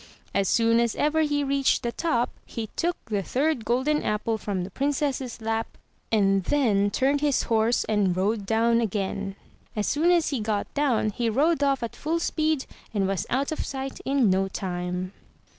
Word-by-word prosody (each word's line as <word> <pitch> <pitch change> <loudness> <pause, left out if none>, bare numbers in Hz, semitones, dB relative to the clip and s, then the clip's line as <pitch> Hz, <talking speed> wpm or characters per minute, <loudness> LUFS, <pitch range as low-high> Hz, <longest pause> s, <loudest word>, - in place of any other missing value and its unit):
As 195 -2 +1
soon 230 0 +3
as 235 -2 +1
ever 310 +2 +2
he 290 -2 +1
reached 275 -1 +1
the 235 - -1
top, 245 -5 0 0.2
he 225 -2 -5
took 350 +1 0
the 210 -3 -1
third 265 - 0
golden 260 +6 +1
apple 215 +1 -1
from, 195 -4 -2
the 190 - -7
Princess' 275 -1 -1
lap, 225 +1 -2 0.3
and 195 -3 +3
then 210 -8 +2
turned 275 +7 +1
his 290 -3 +2
horse 225 0 +2
and 200 -4 +1
rode 200 +1 0
down 230 +2 +3
again. 195 -2 -2 0.4
As 210 -1 0
soon 320 +4 +2
as 345 -3 +3
he 275 - -1
got 210 -1 -2
down, 260 -7 +1
he 230 +2 -1
rode 295 +7 +2
off 275 -3 +2
at 235 - -4
full 320 +3 -1
speed, 310 -3 0 0.3
and 195 -2 +2
was 195 -3 -2
out 275 +4 0
of 315 - -2
sight 270 0 -5
in 265 -7 +2
no 190 +1 +2
time. 180 0 -4
235 Hz, 180 wpm, -26 LUFS, 205-280 Hz, 0.4 s, soon